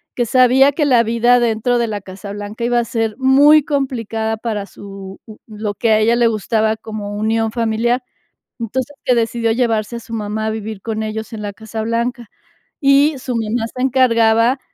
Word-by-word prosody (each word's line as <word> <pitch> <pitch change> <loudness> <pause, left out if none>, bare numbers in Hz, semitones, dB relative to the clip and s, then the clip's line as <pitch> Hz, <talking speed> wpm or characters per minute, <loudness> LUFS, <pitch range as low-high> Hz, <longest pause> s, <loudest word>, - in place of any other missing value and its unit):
que 240 - 0
sabía 255 +3 +5
que 300 +1 0
la 245 -4 +4
vida 235 +2 +3
dentro 235 +1 +1
de 235 - 0
la 210 -1 -3
Casa 190 +1 -9
Blanca 205 +3 -6
iba 240 0 +2
a 235 - -1
ser 225 -2 -2
muy 285 +3 +6
complicada 230 -6 -2
para 215 -3 -3
su 195 -1 -10 0.3
lo 210 -1 -4
que 230 +1 +1
a 215 - +4
ella 230 +2 +3
le 240 -1 +4
gustaba 220 0 0
como 215 -2 -6
unión 220 +1 0
familiar. 235 +2 0 0.6
Entonces, 255 +5 -3
que 250 - +3
decidió 230 0 0
llevarse 230 -2 0
a - - -6
su 230 - -11
mamá 215 0 -3
a - - 0
vivir 220 -1 -5
con 220 -1 -3
ellos 220 +1 -5
en 220 - -6
la 205 -1 -4
Casa 220 0 -6
Blanca, 235 +1 -2 0.5
y 280 +2 +4
su 250 -1 -4
mamá 225 +1 -1
se 255 - -4
encargaba, 240 -1 +3
230 Hz, 185 wpm, -18 LUFS, 215-245 Hz, 0.6 s, muy